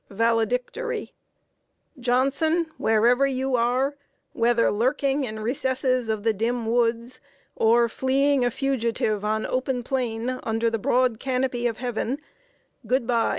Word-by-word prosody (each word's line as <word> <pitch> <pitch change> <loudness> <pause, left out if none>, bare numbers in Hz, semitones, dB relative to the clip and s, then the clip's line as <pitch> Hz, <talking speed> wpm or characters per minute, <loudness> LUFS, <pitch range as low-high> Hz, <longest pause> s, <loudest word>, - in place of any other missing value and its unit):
"VALEDICTORY. 245 - -1 0.9
"Johnson, 275 +7 +1
wherever 240 +5 +3
you 265 -1 -1
are 250 +4 +1 0.4
whether 235 0 +2
lurking 270 +5 0
in 220 -2 -6
recesses 255 0 -1
of 215 -2 -1
the 225 -1 +2
dim 230 +3 -1
woods, 235 +1 0 0.4
or 235 +1 +4
fleeing 270 +2 +1
a 245 - +2
fugitive 230 -5 -1
on 215 +1 -1
open 255 -1 -1
plain, 250 -1 -2
under 225 +1 0
the 225 - -1
broad 245 +1 +1
canopy 255 -2 -1
of 230 -2 -3
Heaven 245 +2 -3 0.7
good 255 -1 +1
by! 230 -1 +1
245 Hz, 125 wpm, -24 LUFS, 230-260 Hz, 0.9 s, or